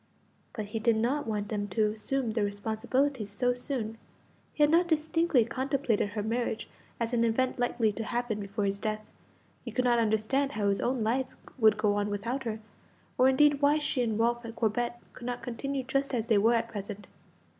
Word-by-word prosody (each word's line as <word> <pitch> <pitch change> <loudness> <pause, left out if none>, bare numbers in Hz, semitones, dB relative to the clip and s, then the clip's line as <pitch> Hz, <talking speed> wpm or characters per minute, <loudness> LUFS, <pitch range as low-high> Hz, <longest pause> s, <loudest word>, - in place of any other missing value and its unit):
But 215 -4 -4
he 225 +1 -2
did 230 +1 +3
not 245 +5 0
want 210 -2 -2
them 205 -2 -2
to 210 +2 +1
assume 230 +3 -2
their 215 -1 0
responsibilities 220 +4 -1
so 245 +5 +1
soon. 240 -3 -4 0.5
He 300 - +1
had 295 - +5
not 345 +2 +4
distinctly 315 -5 +2
contemplated 255 -4 0
her 210 -1 -2
marriage 230 0 -2 0.3
as 230 +1 -2
an 235 -1 +3
event 250 +3 +1
likely 240 -3 +1
to 225 +2 -4
happen 240 -2 -2
before 200 +1 -2
his 200 0 -1
death. 215 0 -3 0.6
He - - -6
could 250 +3 0
not 240 -1 +4
understand 230 +6 +1
how 205 -1 +1
his 200 - 0
own 250 -2 0
life 255 +4 -1 0.2
would 220 -2 +5
go 210 -1 +2
on 205 0 0
without 235 +6 -3
her: 220 -1 -3 0.6
or 255 +1 +7
indeed 290 +1 +4
why 290 +1 +5
she 295 -3 0
and 225 -3 0
Ralph 240 +1 +1
Corbet 235 +2 0 0.2
could 240 - -8
not 245 0 -4
continue 270 +3 -3
just 275 +1 -1
as 225 -2 -1
they 220 -3 +4
were 225 +3 +4
at 230 0 0
present. 205 -1 -6
230 Hz, 195 wpm, -29 LUFS, 215-260 Hz, 0.6 s, or